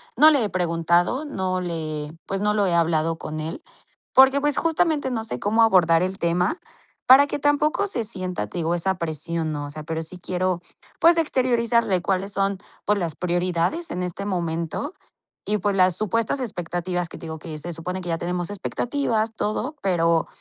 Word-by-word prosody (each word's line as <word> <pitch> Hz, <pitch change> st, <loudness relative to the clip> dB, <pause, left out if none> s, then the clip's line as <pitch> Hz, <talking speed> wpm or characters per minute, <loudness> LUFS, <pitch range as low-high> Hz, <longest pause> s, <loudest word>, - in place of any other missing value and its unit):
no 300 Hz, +6 st, +8 dB
le 285 Hz, -6 st, +3 dB
he 210 Hz, -, -1 dB
preguntado, 175 Hz, -, +1 dB
no 185 Hz, -9 st, -2 dB
le 155 Hz, -4 st, -4 dB, 0.2 s
pues, 195 Hz, -, -2 dB
no 210 Hz, 0 st, +2 dB
lo 205 Hz, -2 st, +2 dB
he 175 Hz, -, +1 dB
hablado 165 Hz, -1 st, +1 dB
con 155 Hz, -1 st, -6 dB
él, 160 Hz, -, -5 dB, 0.5 s
porque, 265 Hz, +1 st, +7 dB
pues, 295 Hz, -1 st, +1 dB
justamente 320 Hz, -4 st, +1 dB
no 225 Hz, -3 st, -2 dB
sé 125 Hz, -, -5 dB
cómo 220 Hz, -, +3 dB
abordar 175 Hz, -6 st, +4 dB
el 185 Hz, +1 st, -3 dB
tema 175 Hz, -, +1 dB, 0.5 s
para 270 Hz, +3 st, +8 dB
que -, -, -2 dB
tampoco 290 Hz, +6 st, +2 dB
se 240 Hz, -12 st, -1 dB
sienta, 185 Hz, -, -3 dB
te 105 Hz, -, -8 dB
digo, 165 Hz, +1 st, 0 dB
esa 190 Hz, +2 st, 0 dB
presión, 165 Hz, 0 st, -3 dB
¿no? 145 Hz, -1 st, -4 dB
O -, -, -7 dB
sea, 155 Hz, +1 st, -7 dB
pero 160 Hz, +1 st, -3 dB
sí 165 Hz, +3 st, -6 dB
quiero, 180 Hz, 0 st, -1 dB, 0.4 s
pues, 335 Hz, +1 st, +6 dB
exteriorizarle 235 Hz, -, +2 dB
cuáles 195 Hz, +2 st, -1 dB
son, 195 Hz, 0 st, 0 dB, 0.3 s
pues, 210 Hz, -, +2 dB
las 165 Hz, -4 st, -2 dB
prioridades 180 Hz, -, 0 dB
en 180 Hz, -, -3 dB
este 180 Hz, +2 st, -4 dB
momento 170 Hz, -, -2 dB, 0.5 s
y, 210 Hz, +1 st, +1 dB
pues, 200 Hz, +1 st, 0 dB
las 185 Hz, -2 st, +4 dB
supuestas 225 Hz, +4 st, 0 dB
expectativas 175 Hz, -5 st, -3 dB
que, -, -, -9 dB
te -, -, -9 dB
digo 160 Hz, 0 st, -5 dB
que 155 Hz, 0 st, -7 dB
se 175 Hz, +3 st, -5 dB
supone 180 Hz, +3 st, -4 dB
que 175 Hz, -, -6 dB
ya 165 Hz, -, 0 dB
tenemos 175 Hz, +1 st, -2 dB
expectativas, 225 Hz, +2 st, -1 dB
todo, 220 Hz, +8 st, -2 dB
pero, 170 Hz, -3 st, +2 dB
185 Hz, 190 wpm, -23 LUFS, 170-230 Hz, 0.5 s, no